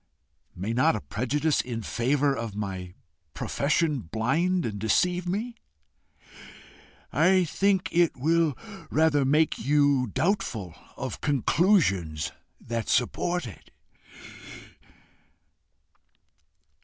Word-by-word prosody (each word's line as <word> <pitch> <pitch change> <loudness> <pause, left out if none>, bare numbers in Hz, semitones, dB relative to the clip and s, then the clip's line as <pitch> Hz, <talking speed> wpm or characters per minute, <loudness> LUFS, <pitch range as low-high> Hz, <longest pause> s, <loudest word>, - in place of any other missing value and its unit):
"May 100 +6 -3
not 125 -1 +3
a 105 - -4
prejudice 145 +7 0
in 115 -3 -5
favour 135 +6 +1
of 115 -4 -5
my 95 -3 -5 0.4
profession 150 0 0
blind 140 - 0
and 105 -3 -4
deceive 175 - +1
me?" 230 +5 -3 1.6
"I 185 +5 +4
think 190 +3 +1
it 170 -3 +2
will 160 +1 +1 0.3
rather 150 -3 +3
make 150 +4 +2
YOU 140 -2 +3
doubtful 115 - -1 0.2
of - - -5
conclusions 130 - +1 0.3
that 115 -1 -4
support 175 +7 0
it." 110 - -11
145 Hz, 95 wpm, -26 LUFS, 115-170 Hz, 1.6 s, I